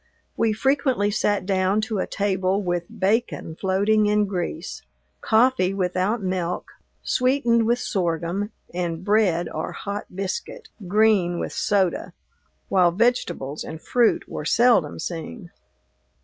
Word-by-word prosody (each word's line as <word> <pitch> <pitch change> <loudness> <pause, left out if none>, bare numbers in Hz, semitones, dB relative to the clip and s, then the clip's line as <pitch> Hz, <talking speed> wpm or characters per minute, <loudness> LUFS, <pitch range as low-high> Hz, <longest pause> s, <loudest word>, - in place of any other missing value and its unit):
We 225 - +2
frequently 260 -2 +1
sat 205 -2 0
down 190 +1 +1
to 215 -2 -2
a - - -1
table 195 0 0
with 175 -1 -1
bacon 195 -4 0
floating 205 +4 +2
in 210 0 +3
grease, 175 -3 -4 0.4
coffee 220 -4 +3
without 190 +4 0
milk, 180 -2 -2 0.3
sweetened 245 -3 +2
with 240 +1 +3
sorghum, 180 -1 -2 0.2
and 175 0 -3
bread 195 -5 +2
or 155 - -4
hot 205 0 -5
biscuit, 195 - -5 0.2
green 200 -3 +3
with - - -4
soda, 195 -4 0 0.5
while 180 -3 +4
vegetables 175 - 0
and 160 - -7
fruit 240 +6 +1
were - - -5
seldom 225 -4 +3
seen. 170 +4 -6
195 Hz, 120 wpm, -23 LUFS, 175-220 Hz, 0.5 s, while